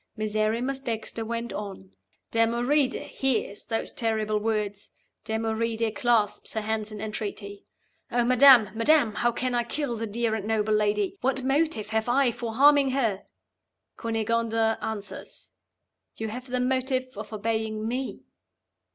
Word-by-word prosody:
Miserrimus 215 +5 0
Dexter 225 -3 -4
went 235 +1 -4
on: 195 - -7 0.4
"Damoride 245 +5 +2
hears 230 -6 -1
those 225 -1 -2
terrible 220 -2 0
words; 210 -2 -2 0.4
Damoride 225 0 -1
clasps 230 -4 +1
her 220 - -1
hands 215 0 -2
in 210 - -7
entreaty. 205 -1 -6 0.4
'Oh, 240 0 +2
madam! 250 -4 +7
madam! 230 0 +4
how 240 +3 +1
can 250 +2 -2
I 240 0 +2
kill 245 +1 -2
the 225 0 -3
dear 225 +1 -1
and 215 -2 -3
noble 215 -1 +1
lady? 210 -1 +1
What 265 +1 0
motive 270 -5 0
have 220 +1 0
I 260 0 +3
for 230 -1 -5
harming 285 +1 +6
her?' 230 -7 0 0.7
Cunegonda 225 0 0
answers, 210 -2 -5 0.6
'You 220 0 -4
have 250 +4 -7
the 250 0 -1
motive 255 0 -1
of - - -7
obeying 220 0 -2
Me. 255 +3 -4
225 Hz, 135 wpm, -26 LUFS, 215-250 Hz, 0.7 s, madam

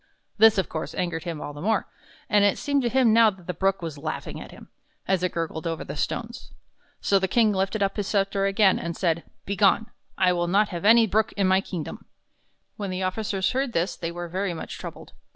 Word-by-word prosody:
This, 220 -1 +7
of 190 - +1
course, 160 0 -5
angered 175 -1 -2
him 165 -3 -4
all 145 - -6
the 145 - -9
more, 215 +3 0 0.4
and 205 -1 +4
it 205 - +3
seemed 285 -1 0
to 240 - 0
him 245 -3 +4
now 230 -1 +7
that 190 -4 -11
the 180 - -3
Brook 195 +1 0
was 155 -3 -5
laughing 155 +1 -5
at - - -9
him, - - -13 0.4
as 190 -2 +2
it 180 - 0
gurgled 165 0 -3
over 165 -1 -3
the - - -7
stones. - - -4 0.5
So 195 - +3
the 190 - 0
King 220 +2 +3
lifted 195 +2 0
up 195 - -1
his 205 -2 -2
scepter 195 -1 +1
again, 195 -1 +3
and 170 0 -4
said: 170 -2 0 0.2
"Be 200 - -2
gone! 205 +3 +3 0.3
I 180 -1 +3
will 175 -1 0
not 205 +4 +3
have 175 0 -5
any 230 +1 +7
Brook 220 +1 +1
in 200 - 0
my 190 +1 +4
kingdom! 175 -5 -6 0.4
" - - -45
When 200 -2 -4
his 185 +1 -3
officers 190 0 -1
heard 265 -1 -1
this 175 +1 0
they 165 -1 -4
were 175 0 -6
very 185 +1 -2
much 160 - -7
troubled. - - -9
190 Hz, 230 wpm, -25 LUFS, 175-210 Hz, 0.5 s, This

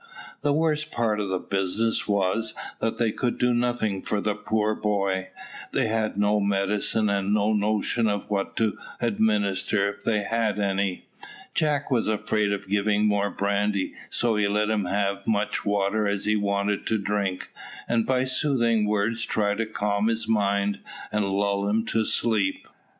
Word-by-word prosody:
The 145 - +1
worst 155 0 +1
part 110 -3 0
of 105 - -1
the 95 -1 0
business 100 +5 0
was, 100 +2 0 0.2
that 115 - -1
they 115 -2 +1
could 120 +2 -2
do 125 0 +2
nothing 120 -5 0
for 105 - -1
the 105 +1 0
poor 105 +1 0
boy. 100 -3 -1 0.4
They - - +2
had 110 -1 -1
no 105 +1 +3
medicine, 100 +2 +1
and 100 -1 0
had 100 - +2
no 105 +1 +2
notion 110 +2 +1
of 105 -1 -1
what 100 -2 -2
to 110 -2 0 0.2
administer 105 -3 +1
if 100 - -17
they 105 -3 +1
had 115 -1 0
had - - -3
any. 100 -2 -1 0.5
Jack 145 -2 0
was 120 -3 +2
afraid 105 -1 0
of 100 -1 -3
giving 105 +1 +2
more 100 -1 +2
brandy, 100 -1 0 0.2
so 120 -2 +1
he 105 -1 +2
let 105 +1 +1
him 105 -3 0
have 100 +1 0
as - - -21
much 105 -1 0
water 100 +1 +1
as 100 -1 -1
he 105 0 +2
wanted 100 0 0
to 110 - +2
drink; 100 -2 -2 0.4
and 115 -1 +1
by 130 -1 +2
soothing 125 -5 +1
words 105 +2 0
tried 105 -2 0
to 115 - 0
calm 105 -1 0
his 115 -1 0
mind, 100 -2 +1 0.3
and 105 -2 0
lull 100 0 0
him 110 +2 +1
to 110 -1 0
sleep. 105 -5 +1
105 Hz, 175 wpm, -25 LUFS, 100-110 Hz, 0.5 s, no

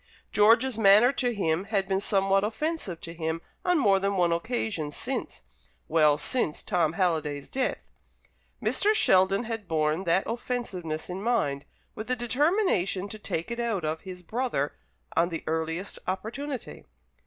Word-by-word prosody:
George's 230 +3 +4
manner 215 +4 +7
to 250 -3 0
him 185 -4 0
had 200 -3 0
been 195 0 0
somewhat 195 -1 +2
offensive 220 - -2
to 165 - -7
him 160 -1 -2 0.2
on 360 -1 +3
more 200 -9 +4
than 195 0 0
one 175 -2 +3
occasion 200 -3 -2
since 145 - -4 0.4
well, 150 -2 +4
since 155 - -1
Tom 165 -3 +1
Halliday's 155 -6 -1
death. 260 -1 -2 0.7
Mr. 425 +1 +2
Sheldon 190 - +4
had 225 -4 -5
borne 155 +2 0
that 170 +3 +3
offensiveness 200 -10 -4
in 185 +1 -5
mind, 175 -12 0 0.3
with 215 - -7
the 255 - +1
determination 240 - +1
to 215 - -8
"take 170 -2 -3
it 235 - -4
out 225 -8 -1
of" 155 +1 -2
his 180 -1 -9
brother 220 - -1 0.4
on 170 +1 +3
the 165 -2 -5
earliest 160 +4 -2
opportunity. 235 +8 -4
195 Hz, 150 wpm, -27 LUFS, 165-235 Hz, 0.7 s, manner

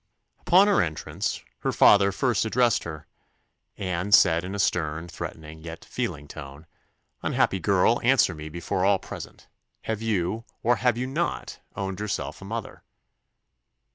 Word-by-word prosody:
Upon 185 +3 +5
her 205 -2 +4
entrance, 80 -2 -3 0.2
her - - -1
father 100 -1 +6
first 115 0 +1
addressed 120 0 +2
her, 80 -2 -7 0.7
and 95 +1 +2
said 85 -2 +4
in 95 +2 -5
a - - -3
stern, 80 -4 0
threatening, 80 -2 -8
yet 85 0 -9
feeling 75 - -4
tone, 70 +3 -10 0.6
"Unhappy 95 - +1
girl, 100 +6 +3
answer 120 -6 +4
me 75 0 -8
before 85 +3 -2
all 100 0 +4
present - - -10 0.4
Have 110 -1 -3
you, 110 0 -1 0.2
or 120 +1 +3
have 120 -1 +2
you 125 - -1
not, 155 +7 -3 0.2
owned 95 -1 -4
yourself 90 -9 -4
a - - -9
mother?" 115 +2 -6
95 Hz, 145 wpm, -26 LUFS, 80-115 Hz, 0.7 s, father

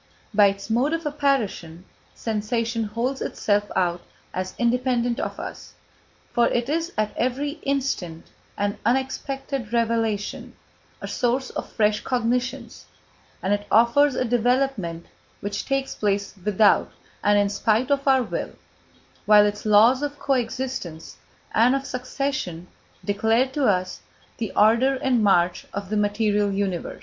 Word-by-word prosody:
By 205 0 +6
its 195 0 -3
mode 245 +7 +1
of 330 -1 -2
apparition, 260 - -1 0.3
sensation 225 +1 -2
holds 235 +6 -2
itself 205 0 0
out 175 -2 +1 0.3
as 185 0 -4
independent 245 0 +1
of - - -4
us, - - -8 0.6
for 240 -1 +4
it 240 0 0
is 330 +3 -1
at 215 -1 -1
every 285 +5 -2
instant 255 -12 -2 0.3
an 205 0 -1
unexpected 265 -1 -2
revelation, 230 -3 -1 0.5
a - - -5
source 250 +2 -1
of - - -6
fresh 210 -1 +2
cognitions, 245 0 -2 0.6
and 195 - +2
it 205 0 -2
offers 240 +5 +4
a 255 - 0
development 240 -8 0 0.3
which 205 0 -4
takes 275 0 -1
place 200 -1 -1
without 210 +1 +3 0.3
and 205 0 +4
in 205 0 +3
spite 220 +6 +1
of 280 0 +1
our 265 -1 +5
will; - - -4 0.7
while 210 0 +7
its 205 +1 -2
laws 225 +5 +6
of 290 0 -3
co 280 - 0
existence 245 -10 -4 0.4
and 240 +4 +4
of 275 0 -3
succession 255 - -3 0.4
declare 220 +4 +2
to 275 +1 -1
us 185 -2 0 0.4
the 220 -3 -3
order 235 +6 +4
and 255 -3 +1
march 180 -3 +2
of 200 0 -5
the - - 0
material 205 0 +1
universe. 195 -3 -3
230 Hz, 140 wpm, -24 LUFS, 205-260 Hz, 0.7 s, while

